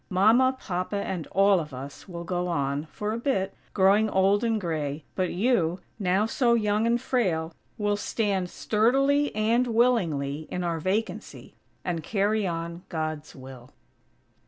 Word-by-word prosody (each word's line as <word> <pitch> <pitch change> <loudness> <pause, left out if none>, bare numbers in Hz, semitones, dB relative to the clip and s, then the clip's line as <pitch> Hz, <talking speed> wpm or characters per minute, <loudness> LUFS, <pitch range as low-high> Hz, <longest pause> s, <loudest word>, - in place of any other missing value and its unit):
Mama, 230 +7 +4
Papa, 185 +1 -3
and 190 -4 -3
all 195 -1 +4
of 150 -5 -6
us 140 +8 -9
will 170 -1 -6
go 180 +1 -2
on, 140 -3 -1
for 210 0 -3
a 230 - -3
bit, 195 -7 -1 0.2
growing 205 +3 +4
old 195 +2 +3
and 225 -2 +1
gray, 155 -5 -3
but 185 -1 -1
you, 185 -4 +1 0.2
now 190 +1 +2
so 235 +1 +2
young 210 0 +1
and 235 +1 +2
frail, 185 -11 0 0.2
will 205 -2 +1
stand 200 -4 -1
sturdily, 275 +9 +2
and 230 +4 +2
willingly, 165 - +1
in 180 - -3
our 170 -2 -1
vacancy; 195 +7 -3 0.3
and 170 -2 -2
carry 205 +3 0
on 170 0 -4
God's 155 -2 -4
will! 130 -2 -11
190 Hz, 150 wpm, -26 LUFS, 165-220 Hz, 0.3 s, Mama